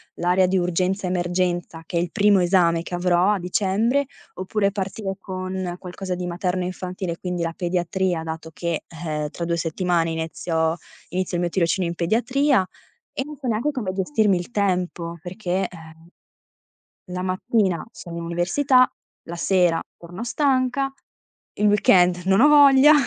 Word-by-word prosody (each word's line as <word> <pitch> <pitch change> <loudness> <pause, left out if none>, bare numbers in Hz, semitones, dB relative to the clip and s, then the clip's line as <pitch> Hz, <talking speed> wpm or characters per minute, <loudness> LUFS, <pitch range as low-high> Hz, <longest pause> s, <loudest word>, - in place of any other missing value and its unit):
l'area 180 +1 +2
di 190 +1 +1
urgenza 180 +2 0
emergenza, 175 -2 -1
che 175 - -3
è 170 - +3
il 175 - -3
primo 200 0 +4
esame 175 -2 +3
che 175 - -5
avrò 180 +2 +3
a 205 - 0
dicembre, 210 +9 +1 0.3
oppure 200 +2 0
partire 195 0 -4
con 185 -1 -4
qualcosa 185 0 -5
di 180 - -4
materno 180 +1 -1
infantile, 180 -1 -4
quindi 180 -2 -3
la 165 0 -2
pediatria, 175 -1 -1
dato 160 0 -6
che, 170 -1 -3
ehm, 155 -3 -4
tra 170 - -6
2 170 0 0
settimane 175 +2 -1 0.2
inizio- 160 0 -1 0.3
inizio 185 -1 -2
il - - -1
mio 175 - 0
tirocinio 175 0 +1
in 170 - -4
pediatria. 240 - +2 0.5
E 270 - -2
non 300 0 -8
so 265 - -6
neanche 235 +6 0
come 210 -9 -3
gestirmi 200 -1 +2
il 175 +7 -6
tempo, 180 -4 -1
perché, 185 0 -2
ehm, 160 -1 -14 1.1
la 180 - -3
mattina 185 0 0
sono 170 -5 -9
in 170 - -4
università, 255 - +3 0.4
la 170 - -5
sera 175 -2 +2 0.2
torno 175 +6 -8
stanca, 270 0 +1 0.6
il 210 - +2
weekend 180 -3 +4
non 195 +4 +4
ho 295 - +8
voglia. 285 0 +7
180 Hz, 155 wpm, -23 LUFS, 175-200 Hz, 1.1 s, ho